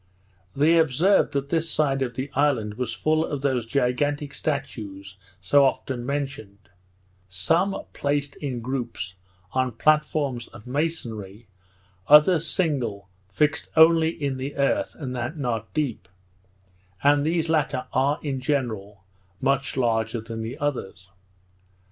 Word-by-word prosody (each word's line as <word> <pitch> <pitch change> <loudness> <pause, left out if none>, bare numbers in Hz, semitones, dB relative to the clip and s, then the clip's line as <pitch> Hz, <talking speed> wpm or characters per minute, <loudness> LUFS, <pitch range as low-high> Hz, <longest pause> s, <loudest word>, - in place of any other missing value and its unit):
They 160 +4 +4
observed 160 +6 +3
that 140 0 -2
this 165 +1 0
side 135 -3 +1
of 125 -2 -2
the 135 +2 -4
island 130 -7 +1
was 125 +3 -3
full 155 +1 +1
of 145 -4 -3
those 130 -5 0
gigantic 140 +3 0
statues 105 -10 -4 0.2
so 140 +10 +4
often 130 -2 -1
mentioned; 140 -8 -5 0.6
some 165 - +1 0.2
placed 145 0 -1
in 130 -5 -4
groupes 120 -7 -4 0.4
on 130 -2 0
platforms 145 -2 +1
of 105 - -14
masonry, 120 -8 -4 0.6
others 155 +2 +6
single, 125 - -1 0.2
fixed 150 +10 0
only 160 0 +6
in 140 -5 -3
the 135 +2 -5
earth, 140 -1 0
and 130 -4 -5
that 125 +6 -3
not 115 -6 -3
deep; 145 -7 -2 1.0
and 145 0 +4
these 165 +1 0
latter 150 -5 0
are, 140 +3 +2
in 140 -3 -2
general, 110 -8 -2 0.4
much 135 +1 0
larger 115 -2 +1
than 115 0 -6
the 115 +3 -5
others. 100 -9 -4
135 Hz, 130 wpm, -25 LUFS, 120-150 Hz, 1.0 s, others